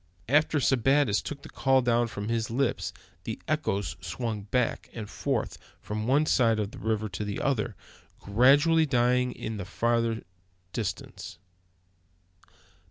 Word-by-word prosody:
After 150 +3 +3
Sebattis 135 -3 +3
took 140 -1 -7
the - - -10
call 135 -1 +2
down 120 0 +2
from 105 -2 -5
his 115 -1 -1
lips 125 +2 0 0.3
the - - -5
echoes 100 -2 -1
swung 115 -4 -3
back 125 0 0
and 110 -3 -6
forth - - -2 0.2
from 110 +1 -4
one 145 +4 +4
side 115 -7 +3
of 105 -1 -2
the - - -10
river 110 -1 -1
to 95 +3 -4
the 105 -1 -3
other, 120 -5 0 0.4
gradually 145 +9 +4
dying 125 -1 +3
away - - -8
in 110 -1 -3
the 100 - -5
far 115 +3 +1 0.6
distance. 100 -5 -5
115 Hz, 145 wpm, -28 LUFS, 110-135 Hz, 0.6 s, one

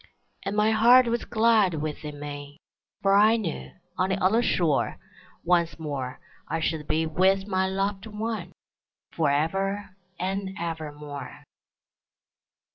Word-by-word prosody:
And 195 - -3
my 210 +1 +3
heart 240 +4 +7
was 235 0 -1
glad 220 -6 +3
within 150 -1 -5
me, 145 0 -7 0.5
For 195 0 +4
I 215 +3 +6
knew, 195 -8 -4 0.3
on 185 - +2
the 190 - +1
other 205 +6 +3
shore, 170 - +1 0.5
Once 170 -3 +2
more 140 -5 -5 0.3
I 165 - -2
should 160 -1 -2
be 160 +1 +1
with 190 +4 +2
my 190 -1 +1
loved 195 +2 -2
one, 220 +1 -4 0.6
Forever 190 +7 0 0.3
and 190 +1 -3
evermore. 150 -3 -6
185 Hz, 120 wpm, -26 LUFS, 155-205 Hz, 0.6 s, heart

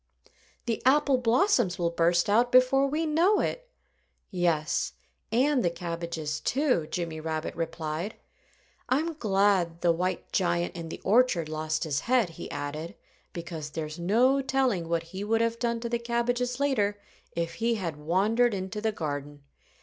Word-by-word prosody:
"The 230 -2 -2
apple 275 0 +4
blossoms 240 - +2
will 170 -1 0
burst 170 +1 +2
out 235 +4 +3
before 255 +2 +5
we 305 +4 -1
know 340 +7 +3
it." - - -3 0.6
"Yes 170 -3 0 0.4
and 260 +3 +3
the 175 - +3
cabbages, 170 -3 -4
too," 260 - +1
Jimmy 165 -3 -3
Rabbit 160 +1 -3
replied. 165 +3 -3 0.7
"I'm 315 +6 +1
glad 195 - +1
the 175 - +4
white 180 +1 -2
giant 175 -2 0
in 165 -1 -6
the - - -7
orchard 205 -6 +3
lost 155 0 -2
his 145 -4 -1
head," 240 -6 +2
he 160 - -8
added, 155 +5 -5 0.4
"because 165 -3 -6
there's 155 +1 -5
no 245 +10 +3
telling 255 -11 0
what 170 -1 0
he 190 +2 -4
would 225 +2 +1
have 230 0 0
done 235 -1 0
to 235 - -3
the 235 0 0
cabbages 245 +1 -1
later, 210 -8 +1 0.4
if 170 0 -2
he 230 0 +2
had 170 -7 -4
wandered 205 +9 +2
into 190 +3 -4
the 220 0 +1
garden. 145 -5 -5
195 Hz, 155 wpm, -28 LUFS, 165-245 Hz, 0.7 s, before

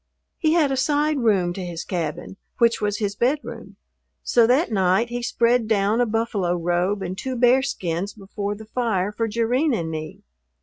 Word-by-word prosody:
He 315 -1 +2
had 310 -5 +3
a 270 - 0
side 295 +2 +1
room 195 -7 +2
to 190 - -6
his 170 -2 -5
cabin, 170 +1 -4 0.2
which 235 -2 +3
was 205 -1 0
his 205 -2 -2
bedroom; 265 +7 -2 0.5
so 235 -2 +4
that 260 +4 +2
night 190 +3 +2
he 240 0 -3
spread 240 -1 +1
down 215 +2 +2
a 245 - +2
buffalo 215 -5 0
robe 175 +3 0
and 185 0 -4
two 260 +6 -4
bearskins 240 -8 +1
before 200 0 -5
the 220 +1 -11
fire 215 -4 -1
for 225 +2 -2
Jerrine 240 +6 +1
and 165 -5 -3
me. 155 -1 -7
220 Hz, 175 wpm, -23 LUFS, 190-245 Hz, 0.5 s, so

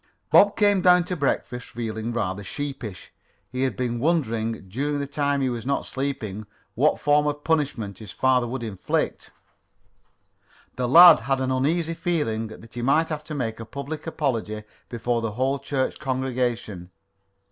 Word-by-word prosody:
Bob 205 0 +6
came 205 -3 +4
down 180 0 +6
to 180 +1 -3
breakfast 130 -4 -2
feeling 110 -1 -4
rather 100 -4 -2
sheepish. 130 - -6 0.4
He 130 - -3
had 135 -1 0
been 120 -2 -1
wondering, 115 - 0
during 140 +9 -2
the 140 - -2
time 140 0 0
he 130 - +1
was 120 -2 -4
not 140 +3 -1
sleeping, 110 -7 -4 0.3
what 145 +6 +2
form 150 0 +3
of 145 0 -3
punishment 140 - -1
his 110 -3 -10
father 130 -2 +2
would 120 0 -4
inflict. 100 -5 -2 1.5
The 125 -1 -1
lad 170 +3 +10
had 135 +3 -1
an 130 0 -1
uneasy 160 +6 +1
feeling 145 -11 -1
that 110 +1 -13
he 120 - -5
might 155 +6 +2
have 150 -1 -4
to 155 - -6
make 115 -5 -3
a - - -5
public 140 +7 -6
apology 115 -9 -2 0.3
before 120 0 -1
the 115 -2 -3
whole 135 +4 0
church 135 -2 -2
congregation. 125 -8 -2
130 Hz, 160 wpm, -24 LUFS, 115-145 Hz, 1.5 s, lad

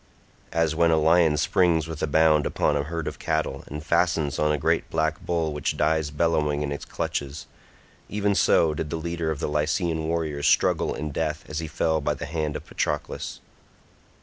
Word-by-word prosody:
As 80 -1 +1
when 85 +1 +3
a 80 - +4
lion 80 0 +4
springs 85 -2 +2
with 80 -2 -6
a - - +1
bound 75 0 +4
upon 75 - +1
a 70 - +1
herd 80 +1 -4
of - - -5
cattle 80 -4 -2
and 75 +2 -7
fastens 80 -4 +1
on 75 0 +2
a 75 - +1
great - - 0
black 80 0 -1
bull 80 -3 -1
which 75 -2 -2
dies 80 -1 +1
bellowing 75 -1 +1
in 70 - -3
its 70 - -5
clutches—even 100 +8 -5
so 80 -4 +3
did 75 0 -4
the - - -3
leader 85 0 -3
of 80 - -2
the - - -1
Lycian 80 +2 0
warriors 80 -3 -1
struggle - - +2
in 75 0 -4
death 75 0 -2
as 75 0 -4
he 80 - -4
fell 80 0 0
by - - 0
the - - -6
hand 75 0 -2
of - - -6
Patroclus. 75 - -3
80 Hz, 190 wpm, -25 LUFS, 75-80 Hz, -, a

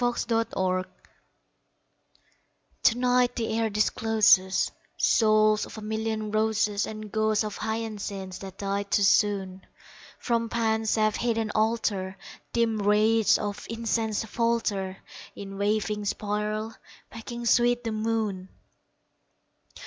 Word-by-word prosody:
In - - +4
an 245 - 0
Autumn 230 -1 0
Garden 185 0 -1 1.9
TO 240 -2 +4
NIGHT 250 0 +2
the 225 -2 -2
air 225 -1 +1
discloses 210 -3 +3 0.3
Souls 215 -1 +3
of - - -11
a - - -7
million 220 0 -3
roses, 215 -1 +1
And 215 -1 -7
ghosts 215 0 +1
of 210 -1 -5
hyacinths 210 -4 -4
that 195 -1 -9
died 200 0 -2
too 200 - +2
soon; 195 -2 +2 0.5
From 230 -1 -1
Pan's 220 -1 0
safe 215 -1 +2
hidden 225 -2 -1
altar 215 -4 0 0.3
Dim 230 -2 +1
wraiths 215 +2 +4
of 205 -1 -5
incense 225 -1 -1
falter 215 -5 -1 0.4
In 195 0 -8
waving 210 0 0
spiral, 210 +2 -2 0.4
making 235 +1 -7
sweet 240 +1 +3
the 225 - -2
moon! 215 -4 -2
215 Hz, 120 wpm, -27 LUFS, 205-225 Hz, 1.9 s, In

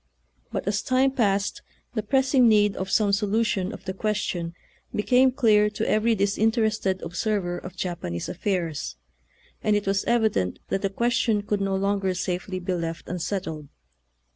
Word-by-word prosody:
But - - -3
as 205 +1 +1
time 260 +1 +2
passed 205 -6 0 0.3
the 220 - -1
pressing 260 +2 +3
need 210 -2 +4
of 190 0 -4
some 205 -2 +2
solution 205 -1 +1
of - - -10
the 190 - -3
question 190 -5 -2 0.4
became 250 +4 +4
clear 215 -5 +4
to 210 - -3
every 225 +2 +3
disinterested 215 -1 +1
observer 175 0 -1
of 185 0 -9
Japanese 160 - -4
affairs, 170 - -2 0.7
and 210 -1 +2
it 205 - 0
was 195 0 +1
evident 220 - +1
that 195 - 0
the 195 - 0
ques 235 +5 0
tion 215 -4 +1
could 205 -1 -1
no 195 -1 0
longer 195 -1 0
safely 180 +1 -3
be 185 0 -2
left 165 -1 -4
un 180 +1 -3
settled. 160 -4 -4
200 Hz, 160 wpm, -25 LUFS, 185-220 Hz, 0.7 s, need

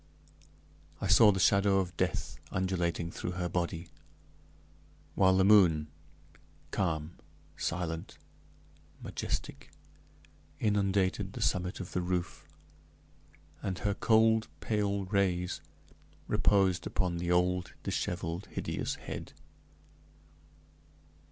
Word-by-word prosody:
I - - -3
saw 105 -2 +7
the 95 - -2
shadow 100 +1 +4
of 90 -2 -1
death - - -2
undulating 90 -2 -1
through 90 - -4
her 90 -1 -2
body, 85 -1 -3 1.2
while 95 -1 +4
the 95 - +5
moon, 90 -7 +5 0.8
calm, 80 -3 -2 0.4
silent, 85 -2 -3 0.9
majestic, - - -4 0.9
inundated 100 -2 +1
the - - -6
summit 90 -1 0
of 90 - -6
the 90 - -1
roof, 90 -3 -3 1.1
and 95 -1 -3
her 100 +1 0
cold, 110 +1 +3
pale 100 -2 -1
rays 95 -2 0 0.7
reposed 95 -4 +2
upon 90 -2 -1
the 85 0 -3
old, 90 +1 +1
disheveled, 85 +1 -3
hideous - - -2
head. - - -7
90 Hz, 95 wpm, -31 LUFS, 85-100 Hz, 1.2 s, saw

